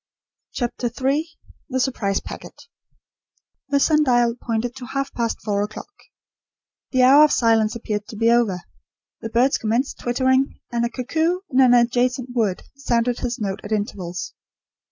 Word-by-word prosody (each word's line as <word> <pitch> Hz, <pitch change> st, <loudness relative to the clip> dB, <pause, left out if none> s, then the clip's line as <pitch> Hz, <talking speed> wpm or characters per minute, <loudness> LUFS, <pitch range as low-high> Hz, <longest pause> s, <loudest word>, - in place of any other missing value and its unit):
CHAPTER 240 Hz, 0 st, -2 dB
III 275 Hz, +6 st, -1 dB, 0.4 s
THE 260 Hz, -1 st, -1 dB
SURPRISE 215 Hz, -7 st, 0 dB
PACKET -, -, -9 dB, 1.1 s
The 280 Hz, 0 st, +2 dB
sun 305 Hz, +1 st, +3 dB
dial 240 Hz, -3 st, +3 dB
pointed 235 Hz, 0 st, -3 dB
to 250 Hz, -2 st, -8 dB
half 275 Hz, +1 st, -3 dB
past 230 Hz, -1 st, -1 dB
four 205 Hz, -2 st, 0 dB
o'clock. 215 Hz, -, -6 dB, 1.0 s
The 255 Hz, -1 st, +2 dB
hour 275 Hz, +4 st, +8 dB
of 305 Hz, -, +4 dB
silence 225 Hz, -2 st, +2 dB
appeared 210 Hz, -2 st, -4 dB
to -, -, -9 dB
be 230 Hz, +2 st, +3 dB
over. 220 Hz, -7 st, +1 dB, 0.6 s
The 225 Hz, -, -5 dB
birds 245 Hz, +4 st, +2 dB
commenced 235 Hz, +4 st, -1 dB
twittering; 260 Hz, +2 st, +1 dB
and 235 Hz, 0 st, 0 dB
a 235 Hz, -, 0 dB
cuckoo, 320 Hz, +9 st, -1 dB
in 255 Hz, -, +2 dB
an 250 Hz, -1 st, +6 dB
adjacent 245 Hz, +1 st, +1 dB
wood, 215 Hz, -7 st, 0 dB
sounded 245 Hz, -3 st, 0 dB
his 240 Hz, -1 st, -3 dB
note 200 Hz, -2 st, -3 dB
at 205 Hz, -, -8 dB
intervals. 195 Hz, -4 st, -3 dB
240 Hz, 155 wpm, -22 LUFS, 225-260 Hz, 1.1 s, hour